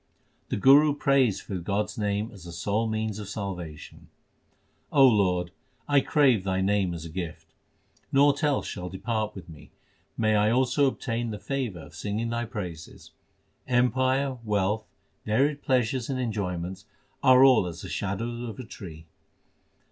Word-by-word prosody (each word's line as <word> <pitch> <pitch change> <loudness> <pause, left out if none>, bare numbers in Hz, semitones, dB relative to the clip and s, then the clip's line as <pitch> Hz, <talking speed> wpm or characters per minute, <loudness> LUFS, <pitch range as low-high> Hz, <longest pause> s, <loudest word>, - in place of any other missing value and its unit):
The - - -1
Guru 140 +6 +6
prays 135 -8 +2
for 100 -2 -5
God 100 +4 0
s - - -10
name 105 +1 -1
as 100 -6 -13
the 85 - -8
sole 100 +6 -1
means 110 -1 -2
of 105 -2 -7
salvation: 90 -7 -7 0.8
O 140 -2 +6
Lord, 90 -7 +2 0.4
I 145 -1 +4
crave 130 -11 +3
Thy 95 -1 -1
name 95 -2 +1
as 80 -1 -7
a - - -7
gift; 85 -1 -7 0.6
Naught 145 +2 +4
else 145 -3 +1
shall 90 0 -5
depart 110 +3 -3
with 95 - -9
me; 80 -3 -13 0.5
may 110 -1 +2
I 105 +1 +3
also 130 +4 +3
obtain 120 -3 -2
the 105 - -4
favour 125 - -3
of - - -13
singing 105 +3 -3
Thy 120 0 -2
praises! 90 -9 -8 0.6
Empire, 130 +2 +1
wealth, 105 0 0 0.4
varied 140 +7 +1
pleasures 125 -2 0
and 130 -2 -2
enjoyments 95 -6 -3 0.4
are 130 0 +7
all 125 -9 +6
as 85 0 -7
the - - -6
shadow 115 +5 -3
of 115 - -7
a 130 - -6
tree. 85 -8 -10
110 Hz, 155 wpm, -27 LUFS, 95-130 Hz, 0.8 s, are